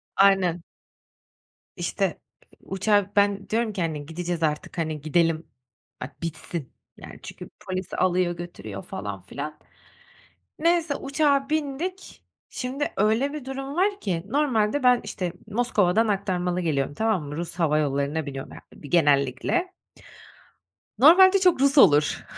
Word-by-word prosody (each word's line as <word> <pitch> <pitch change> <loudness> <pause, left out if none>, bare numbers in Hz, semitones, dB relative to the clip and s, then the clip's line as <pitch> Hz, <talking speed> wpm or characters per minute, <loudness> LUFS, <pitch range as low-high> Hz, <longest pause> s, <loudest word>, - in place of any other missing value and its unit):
Aynen. 190 -3 +3 1.2
İşte, - - -2 0.4
uçağa 200 +1 +1
Ben 200 -1 +2
diyorum 225 -1 0
ki, 190 - -3
"Hani, 155 -3 -3
gideceğiz 170 +1 -4
artık, 150 +2 -2
hani, 155 -2 -2
gidelim. 165 +1 +1 0.5
Bak, - - -8
bitsin." 160 -3 -5 0.2
yani, - - -11
çünkü - - -9 0.2
polis 185 -1 -4
alıyor, 180 -1 +1
götürüyor 105 - -8
falan 100 -2 -6
filan. 145 +11 -7 1.0
Neyse 335 -2 +2
uçağa 275 0 +1
bindik, 315 +5 -4 0.3
şimdi 270 +3 -4
öyle 220 +8 +2
bir 300 -4 -7
durum 270 +1 -5
var 400 +3 +1
ki 175 -5 -2
normalde 260 -2 +1
ben, 250 -1 +5
işte, 180 -3 -4
Moskova'dan 220 -2 +2
aktarmalı 180 -3 -1
geliyorum, 145 -4 -1
tamam 215 -1 0
mı? 145 0 -7
Rus 170 0 -5
hava 160 -4 +1
yollarına 145 +1 -1
biniyorum 135 -2 -7
ya, - - -11
bir 145 - -12
genellikle. 145 - +2 1.2
Normalde 375 - +7
çok 360 -8 +3
Rus 280 +1 +3
olur. 150 - +5
185 Hz, 130 wpm, -25 LUFS, -, 1.2 s, Normalde